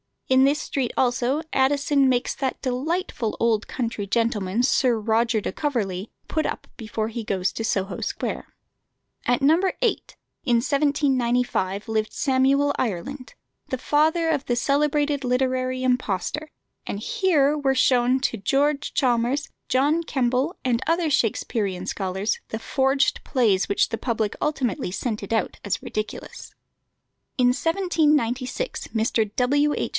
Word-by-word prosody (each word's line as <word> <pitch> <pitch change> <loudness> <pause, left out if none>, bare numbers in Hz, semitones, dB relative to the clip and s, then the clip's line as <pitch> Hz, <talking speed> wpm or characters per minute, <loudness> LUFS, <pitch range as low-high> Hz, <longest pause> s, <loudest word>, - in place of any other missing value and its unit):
In 260 0 +5
this 285 +2 +2
street 260 -4 -2
also 255 +3 +1
Addison 275 +1 +3
makes 245 -1 +1
that 265 -2 -3
delightful 265 - -2
old 225 -2 +1
country 230 -5 -3
gentleman, 220 -1 0
Sir 250 -2 +3
Roger 225 +1 +1
de - - -3
Coverley, 210 - -2 0.2
put 315 - 0
up - - -4
before 220 -1 -3
he 230 0 -5
goes 190 -2 0
to 225 - -4
Soho 195 -2 -1
Square. - - -3 0.8
At 245 +1 +2
No. 305 +5 +5 0.2
8, 475 - -1 0.3
in 245 -4 +3
1795, 250 -6 +1
lived 220 -1 -1
Samuel 275 +2 +2
Ireland, 250 +5 -4 0.3
the 260 - -2
father 315 +5 +2
of 295 -4 0
the 240 - 0
celebrated 290 +2 +1
literary 255 0 0
impostor; 250 - -1 0.4
and - - -3
here 320 - +2
were 270 -2 +1
shown 255 0 +3
to 240 - 0
George 280 +8 0
Chalmers, 250 +3 +1 0.2
John 290 +6 +2
Kemble, 265 +1 0
and 245 -2 +1
other 330 0 +2
Shaksperian 200 -6 0
scholars, 195 +2 -2
the 220 - -4
forged 270 +4 +1
plays 220 -9 +2
which 200 - +2
the 225 - -2
public 220 -4 -1
ultimately 265 -11 -1
scented 215 0 -3
out 225 - -1
as 205 - -2
ridiculous. 215 0 -6 0.8
In 250 -2 +4
1796 300 - 0
Mr. 220 -1 +1
W. 290 +4 +2
H. - - -1
255 Hz, 135 wpm, -24 LUFS, 225-285 Hz, 0.8 s, In